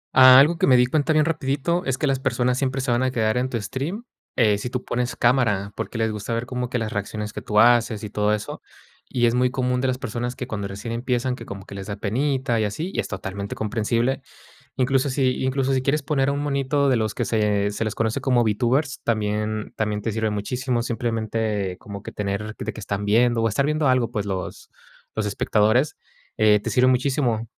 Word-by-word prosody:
Algo 135 +6 +8
que - - +3
me 130 -1 +6
di 125 - +5
cuenta 145 +4 +1
bien 155 -1 +4
rapidito 160 +2 -1
es 130 -1 0
que 150 - -1
las 135 -2 +1
personas 125 -1 0
siempre 135 0 -1
se 130 - -1
van 120 +1 +2
a 130 - +2
quedar 110 -4 0
en 125 +1 0
tu 120 - -2
stream, 140 - -4 0.3
eh, 105 -4 +3
si 125 - -4
tú 125 0 -4
pones 125 +1 -2
cámara, 110 -5 +2
porque - - -5
les 110 -1 +1
gusta 105 +2 -3
ver 115 +1 -2
como 125 -1 -3
que 125 - -1
las 110 -2 -3
reacciones 105 +1 -4
que - - -6
tú 105 0 +1
haces 120 -2 +4
y 105 - -6
todo 105 0 +1
eso. 105 0 -3 0.5
Y 120 -2 +1
es 115 - +3
muy 125 +1 +2
común 125 -1 -1
de 130 - +1
las 130 0 0
personas 120 0 -4
que, 125 - -5
cuando 100 -4 -4
recién 100 +4 -6
empiezan, 125 +1 -1
que - - -11
como 100 -1 -8
que - - -11
les 100 0 -7
da 100 - -4
penita 130 +3 0
y - - +1
así, 155 - -4
y - - -2
es - - -1
totalmente 100 0 -5
comprensible. 115 +4 0 0.6
Incluso 135 +1 +1
si 130 -1 0
incluso 135 0 +1
si 130 - 0
quieres 145 +3 +1
poner 140 -1 +1
a - - +1
un 140 - -2
monito 140 0 +1
de 130 - +3
los 110 -2 -1
que - - -2
se 105 -2 +1
se 105 +2 -3
les 110 0 -2
conoce 110 -1 -1
como 125 -3 +3
Vtubers, 125 +6 0
también 105 -1 -1
también 105 -1 -1
te 115 - -2
sirve 110 0 -1
muchísimo, 120 +4 -2
simplemente, 110 -4 -2
como 100 0 -9
que - - -8
tener 105 +1 -3
de - - -4
que - - -9
están 100 0 -3
viendo, 115 +2 +3
o 115 - +3
estar 135 +6 0
viendo 150 -1 +1
algo, 125 -3 +2
pues, 105 -4 -2
los 95 -2 -5 0.4
los 110 -1 -1
espectadores, 110 +7 +2 0.4
eh, 105 -1 +5
te - - -4
sirve 125 0 +3
muchísimo. 125 -3 +1
120 Hz, 225 wpm, -23 LUFS, 105-130 Hz, 0.6 s, Algo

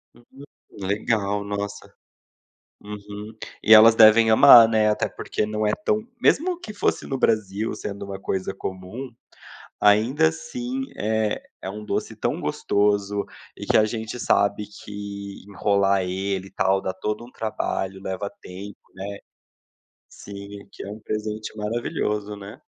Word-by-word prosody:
Hum. 125 +4 -16 0.3
Legal, 100 0 -1
nossa. 100 0 -5 0.9
Uhum, 105 +1 -9 0.3
e 110 - +7
elas 110 +1 +9
devem 110 +1 +7
amar, 115 0 +9
né, 110 -1 +3
até 105 - 0
porque 105 - -3
não 105 0 -1
é 105 - +2
tão 215 +2 0
mesmo 355 +3 +2
que 215 -10 -8
fosse - - 0
no 135 - -2
Brasil 110 -2 0
sendo 100 -1 -6
uma 95 -1 -7
coisa 95 0 -3
comum, 95 +8 -6 0.7
ainda 105 - +4
assim 120 +11 -5 0.2
é 110 0 0 0.2
é 95 - -5
um 105 +1 -8
doce - - -3
tão - - -2
gostoso, 100 0 0 0.3
e - - -7
que - - +3
a 110 - +6
gente 110 +2 -5
sabe 100 0 +2 0.2
que 100 -1 -7
enrolar 100 0 +2
ele, 95 +1 -2
e - - -18
tal, 95 -1 +2
dá 95 - -3
todo 105 +4 -4
um 125 - -16
trabalho 95 -3 -3
leva 95 +1 -4
tempo, 95 +2 -9 0.2
né, 100 +1 -6 0.9
sim, 100 0 -10 0.2
que - - -9
é - - -7
um 110 - -8
presente 110 0 -4
maravilhoso, 105 -1 -2
né? 105 +4 -11
105 Hz, 145 wpm, -24 LUFS, 100-110 Hz, 0.9 s, elas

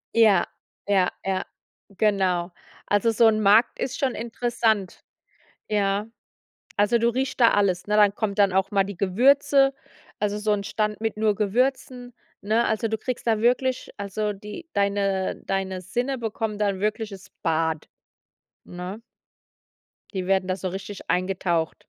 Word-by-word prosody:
Ja, 220 -4 +5 0.4
ja, 190 -3 +3
ja, 190 -1 -1 0.4
genau. 190 -3 +1 0.4
Also, 205 +3 +2
so 225 +1 +5
'n 215 -1 +3
Markt 210 +4 +4
ist 255 - -3
schon 270 -6 0
interessant. 225 -4 -1 0.6
Ja. 205 0 0 0.7
Also, 205 +3 +3
du 235 - +2
riechst 260 +2 -2
da 235 - +7
alles, 190 -3 +1
ne? 210 0 +1
Dann 205 -1 +5
kommen 205 -2 -2
dann 200 -2 +3
auch 190 +2 +1
mal 195 -1 +2
die 200 -2 -7
Gewürze, 270 +7 +3 0.4
also 210 0 -1
so 210 0 0
'n 200 -1 -1
Stand 210 0 -2
mit 225 -1 -1
nur 215 -1 +2
Gewürzen, 245 +3 -1 0.3
ne? 220 +3 +1
Also, 220 +1 0
du 220 - -1
kriegst 250 +1 -5
da 220 -2 +2
wirklich 250 +2 +1
also, 205 +1 -2
die 210 - -9
deine 200 -1 0
deine 190 -1 -2
Sinne 245 +9 -2
bekommen 220 -2 -3
da 210 -1 +1
'n 190 -1 -3
wirkliches 210 -2 -3
Bad, 160 -1 0 0.8
ne? 180 +5 -7 1.1
Die 185 -1 -3
werden 190 -1 +2
da 185 - 0
so 190 - -4
richtig 195 +2 -8
eingetaucht. 180 -3 0
205 Hz, 150 wpm, -24 LUFS, 195-225 Hz, 1.1 s, da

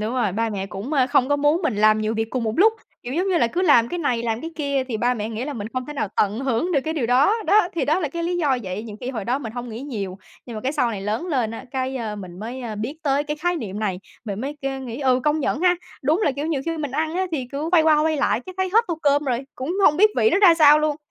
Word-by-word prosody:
Đúng 220 +3 -2
rồi. 235 -7 0
Ba 225 +3 0
mẹ 195 -2 -3
cũng, 200 +9 -6
ờ, 265 -4 +3
không 255 0 +2
có 290 - +2
muốn 295 +5 +2
mình 310 -10 0
làm 215 +1 +4
nhiều 215 +1 -1
việc 225 0 -2
cùng 250 -3 -2
một 220 - -1
lúc. 435 +4 +6 0.3
Kiểu 245 - -6
giống 365 +4 0
như 365 -3 +2
là 235 - +3
cứ 345 +10 -2
làm 240 -10 +5
cái 350 - -4
này, 245 -7 0
làm 225 -1 -2
cái 325 - -6
kia 280 -3 -1
thì 230 - -2
ba 245 +3 +1
mẹ 215 -1 -4
nghĩ 225 +2 -4
là 295 - -4
mình 215 -4 -5
không 255 -1 -3
thể 295 - -6
nào 275 -8 -2
tận 205 +1 +1
hưởng 270 +7 0
được 285 - +3
cái 315 - -2
điều 275 -7 -1
đó. 260 - +4
Đó, 410 -4 +4
thì 335 - 0
đó 310 +5 +1
là 310 - -1
cái 335 +4 -5
lý 350 +1 -1
do 290 -7 +1
vậy. 190 +1 -5
Nhiều 215 -2 -8
khi 250 - -4
hồi 225 -6 -5
đó 250 +5 0
mình 230 -6 -6
hông 245 0 -6
nghĩ 225 +1 -7
nhiều, 200 -9 -5 0.3
nhưng 240 - -7
mà - - -4
cái 260 +5 -1
sau 265 -6 +1
này 205 -4 -4
lớn 215 - -2
lên 255 -10 0
á, 225 - -7
cái, 265 0 -2
ờ, 220 -4 -4
mình 185 -3 -9
mới, 235 +5 -6
ờ, 230 -3 -5
biết 230 +9 -4
tới 280 0 +1
cái 300 0 -3
khái 350 +3 -1
niệm 210 - -5
này, 200 -4 -2 0.3
mình 205 -2 -4
mới 280 +4 -4
cơ 270 0 -3
nghĩ, 250 0 -6
ừm, 255 -2 +2
công 300 +2 +1
nhận 280 +1 -1
ha! 360 0 +4 0.3
Đúng 310 +9 +2
là, 290 - +2
kiểu, 285 +3 -4
nhiều 315 -4 -1
khi 330 0 -1
mình 295 -3 -3
ăn 315 +4 -2
á 375 +1 0
thì 265 -5 -2
cứ 290 +3 -3
quay 340 -3 +6
qua, 310 -1 +4
quay 315 0 +1
lại 275 -5 +1
cái 370 - -8
thấy 375 0 0
hết 455 +3 +5
tô 335 -2 -2
cơm 285 0 +3
rồi, 250 -3 0
cũng 265 +6 -4
hông 295 - +5
biết 425 +4 +5
vị 445 - +4
nó 370 - +3
ra 375 -5 +7
sao 300 -2 +7
luôn, 305 -1 0
270 Hz, 320 wpm, -22 LUFS, 230-310 Hz, 0.3 s, ra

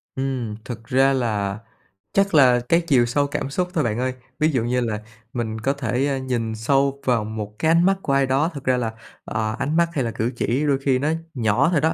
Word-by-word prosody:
Ừm, 130 -5 -2
thực 115 -2 -7
ra 135 +1 +4
là 105 -5 -1 0.5
chắc 200 -2 +2
là 125 -5 +6
cái 170 +1 +4
chiều 125 -5 +4
sâu 140 +4 +1
cảm 140 -1 -3
xúc 180 +6 -1
thôi 155 -5 +1
bạn 115 0 -1
ơi. 130 0 -1 0.3
Ví 155 +1 +3
dụ 130 -6 0
như 125 +1 0
là 110 -3 -2 0.3
mình 110 -2 -3
có 135 +4 +1
thể, 130 0 -1
a, 140 - 0
nhìn 120 -4 -2
sâu 135 +4 +1
vào 120 -4 +2
một 105 -1 -6
cái 160 - +2
ánh 170 +2 +4
mắt 195 0 +4
của 140 - -1
ai 135 0 +3
đó, 135 +5 +1
thực 140 -3 -7
ra 130 0 +2
là, 115 -2 -1 0.3
à, 110 0 -2
ánh 150 +3 -1
mắt 170 0 +3
hay 135 - 0
là 115 - -2
cử 115 +4 -2
chỉ 130 +5 0
đôi 140 -2 +3
khi 135 -2 +1
nó 150 +3 0 0.2
nhỏ 115 +5 +2
thôi 150 -5 +2
đó, 160 +1 +2
130 Hz, 240 wpm, -22 LUFS, 115-140 Hz, 0.5 s, là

